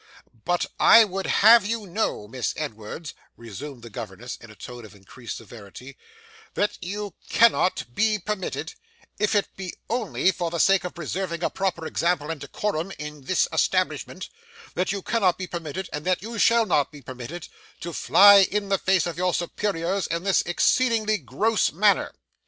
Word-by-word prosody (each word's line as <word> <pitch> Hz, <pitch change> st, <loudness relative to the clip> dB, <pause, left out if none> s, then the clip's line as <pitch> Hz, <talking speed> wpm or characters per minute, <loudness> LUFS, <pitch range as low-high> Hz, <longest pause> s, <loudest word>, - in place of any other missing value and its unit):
'But 175 Hz, 0 st, +1 dB
I 230 Hz, -, +8 dB
would 195 Hz, -2 st, -4 dB
have 225 Hz, +1 st, +6 dB
you 220 Hz, +1 st, -3 dB
know, 180 Hz, -, -2 dB
Miss 120 Hz, +2 st, -3 dB
Edwards,' 145 Hz, +2 st, -6 dB, 0.2 s
resumed 120 Hz, +3 st, -9 dB
the 115 Hz, -, -10 dB
governess 110 Hz, +4 st, -7 dB
in 115 Hz, -, -15 dB
a 110 Hz, -, -14 dB
tone 120 Hz, +2 st, -10 dB
of 105 Hz, -2 st, -13 dB
increased 105 Hz, +4 st, -9 dB
severity, 115 Hz, +4 st, -12 dB, 0.6 s
'that 205 Hz, -, -1 dB
you 200 Hz, +1 st, -5 dB, 0.2 s
cannot 230 Hz, -5 st, +3 dB
be 215 Hz, -, +2 dB
permitted 210 Hz, 0 st, -4 dB, 0.5 s
if 210 Hz, +1 st, +1 dB
it 205 Hz, -, 0 dB
be 185 Hz, -2 st, -7 dB, 0.2 s
only 220 Hz, -5 st, +1 dB
for 170 Hz, -1 st, -3 dB
the 170 Hz, -, -4 dB
sake 195 Hz, +1 st, +4 dB
of 180 Hz, -, -6 dB
preserving 170 Hz, +1 st, -4 dB
a -, -, 0 dB
proper 185 Hz, -4 st, -2 dB
example 165 Hz, -2 st, 0 dB
and 155 Hz, -4 st, -6 dB
decorum 170 Hz, +4 st, -3 dB
in 150 Hz, -2 st, -8 dB
this 185 Hz, -, +2 dB
establishment -, -, -1 dB, 0.5 s
that 180 Hz, +1 st, -1 dB
you 200 Hz, -2 st, -4 dB
cannot 200 Hz, -7 st, +1 dB
be 185 Hz, -, -4 dB
permitted, 170 Hz, +1 st, -5 dB
and 150 Hz, 0 st, -4 dB
that 185 Hz, +1 st, 0 dB
you 230 Hz, 0 st, -6 dB
shall 230 Hz, +1 st, +4 dB
not 150 Hz, -7 st, +1 dB
be 145 Hz, -3 st, -13 dB
permitted, 130 Hz, +7 st, -8 dB, 0.3 s
to 170 Hz, -, -5 dB
fly 200 Hz, +4 st, +7 dB
in 205 Hz, -1 st, -2 dB
the 195 Hz, -, +2 dB
face 190 Hz, -3 st, +2 dB
of 170 Hz, -1 st, -5 dB
your 180 Hz, -1 st, +1 dB
superiors 180 Hz, +1 st, -2 dB
in 170 Hz, +1 st, -3 dB
this 195 Hz, -1 st, +3 dB
exceedingly 215 Hz, +3 st, +2 dB
gross 185 Hz, -, 0 dB
manner. 200 Hz, +5 st, +2 dB
175 Hz, 170 wpm, -24 LUFS, 145-200 Hz, 0.6 s, I